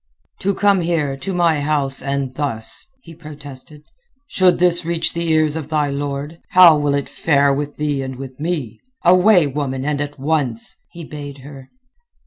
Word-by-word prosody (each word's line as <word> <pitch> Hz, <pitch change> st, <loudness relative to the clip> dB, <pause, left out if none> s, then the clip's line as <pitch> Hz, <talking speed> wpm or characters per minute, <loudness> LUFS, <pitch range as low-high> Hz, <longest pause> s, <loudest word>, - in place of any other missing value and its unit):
"To 200 Hz, 0 st, 0 dB
come 200 Hz, -2 st, +3 dB
here, 160 Hz, -5 st, 0 dB
to 140 Hz, +8 st, -5 dB
my 170 Hz, -4 st, +2 dB
house, 145 Hz, -2 st, 0 dB
and 140 Hz, -2 st, -2 dB
thus!" 130 Hz, -6 st, -3 dB, 0.2 s
he 165 Hz, -, -12 dB
protested. 150 Hz, -2 st, -11 dB, 0.4 s
"Should 185 Hz, -9 st, +3 dB
this 175 Hz, 0 st, +2 dB
reach 170 Hz, 0 st, -1 dB
the 170 Hz, 0 st, -2 dB
ears 155 Hz, -1 st, +2 dB
of 155 Hz, -2 st, -5 dB
thy 150 Hz, -2 st, 0 dB
lord, 145 Hz, +3 st, -4 dB
how 180 Hz, -3 st, +9 dB
will 145 Hz, -1 st, +1 dB
it 140 Hz, -, -2 dB
fare 140 Hz, -3 st, +2 dB
with 145 Hz, +1 st, -3 dB
thee 145 Hz, -2 st, -1 dB
and 130 Hz, -1 st, -5 dB
with 130 Hz, 0 st, -9 dB
me? 150 Hz, -9 st, -3 dB, 0.3 s
Away, 180 Hz, 0 st, +6 dB
woman, 135 Hz, -2 st, -3 dB
and 145 Hz, -1 st, -1 dB
at 145 Hz, 0 st, -5 dB
once!" 135 Hz, -5 st, -1 dB
he 170 Hz, -, -10 dB
bade 145 Hz, -3 st, -8 dB
her. 135 Hz, -2 st, -11 dB
145 Hz, 170 wpm, -19 LUFS, 140-165 Hz, 0.4 s, how